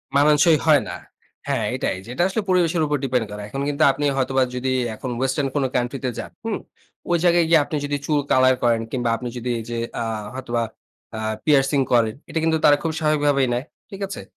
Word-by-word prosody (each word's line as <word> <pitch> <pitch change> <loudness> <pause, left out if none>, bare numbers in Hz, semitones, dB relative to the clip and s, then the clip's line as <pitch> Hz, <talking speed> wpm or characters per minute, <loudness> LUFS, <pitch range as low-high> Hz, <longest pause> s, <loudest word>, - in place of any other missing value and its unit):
মানানসই 150 +2 +5
হয় 150 -3 +5
না। - - -5 0.5
হ্যাঁ, - - 0
এটাই। - - -1 0.2
এটা 175 - +1
আসলে 195 +4 -1
পরিবেশের 175 -2 +2
উপর 150 0 0
ডিপেন্ড 125 -3 0
করে। 105 - -6
এখন 135 - -4
কিন্তু 145 +2 +1
আপনি 145 +2 -3
হয়তোবা 130 0 +2
যদি 130 +1 -1 0.2
এখন 130 - -6
ওয়েসটার্ন 135 +1 0
কান্ট্রি 125 +2 -1
তে 130 - 0
যান, - - -6
হুম। 225 -2 -2 0.5
ওই 170 - +4
জায়গায় 175 -1 +4
গিয়ে 165 -2 +6
আপনি - - -5
যদি 145 0 -1
চুল 150 -2 +1
কালার 130 0 +5
করেন 115 -1 +3
কিংবা 125 -2 -1
আপনি 125 - -6
যদি 120 +1 -4
এইযে 115 +1 -5 0.2
আ - - 0 0.3
হয়তোবা 120 -3 -2 0.5
আ - - -4 0.3
পিয়ার্সিং 140 -1 +3
করেন। 115 -3 +3
এটা 165 - -1
কিন্তু 160 0 +2
তারা 145 - +7
খুবই 160 -1 -2
স্বাভাবিক 155 -1 +1
ভাবেই 140 -2 +3
নেয়। 125 +4 -2 0.3
ঠিক 195 0 -8
আছে? - - -6
140 Hz, 200 wpm, -22 LUFS, 125-155 Hz, 0.5 s, তারা